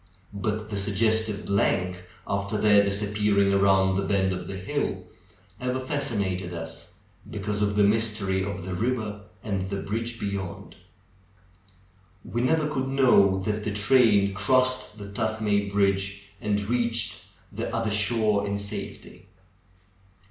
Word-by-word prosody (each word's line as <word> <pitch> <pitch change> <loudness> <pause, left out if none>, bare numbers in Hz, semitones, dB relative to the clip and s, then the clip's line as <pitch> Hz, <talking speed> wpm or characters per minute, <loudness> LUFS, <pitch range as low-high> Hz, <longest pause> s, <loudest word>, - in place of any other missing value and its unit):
But 105 +1 -3
the 100 - -1
suggestive 110 +1 +1
blank, 90 -2 0 0.2
after 100 +1 -2
their 105 -1 +5
disappearing 100 0 +1
around 95 -1 +3
the - - +1
bend 95 -1 +1
of 90 -1 -6
the 95 - -5
hill, 95 - -3 0.5
ever 125 +1 -1
fascinated 100 - -2
us, 80 0 -8 0.4
because 105 0 -3
of 100 0 +1
the 105 - +4
mystery 105 -3 +1
of 100 -2 -5
the 95 - -4
river 110 0 -2 0.2
and 95 -3 -2
the 100 - -2
bridge 115 +2 -3
beyond. 100 -3 -5 1.5
We 120 - -2
never 150 +4 +2
could 130 -3 -2
know 120 -8 +4
that 105 +2 -2
the 105 - -2
train 105 -3 +4
crossed 130 +4 +1
the 100 - -8
Tuthmay 105 -1 0
bridge, 100 0 0
and 105 -1 0
reached 115 -2 0 0.3
the - - -4
other 115 -2 -1
shore 105 -1 +2
in 100 0 -1
safety. 100 0 -7
105 Hz, 135 wpm, -26 LUFS, 100-110 Hz, 1.5 s, their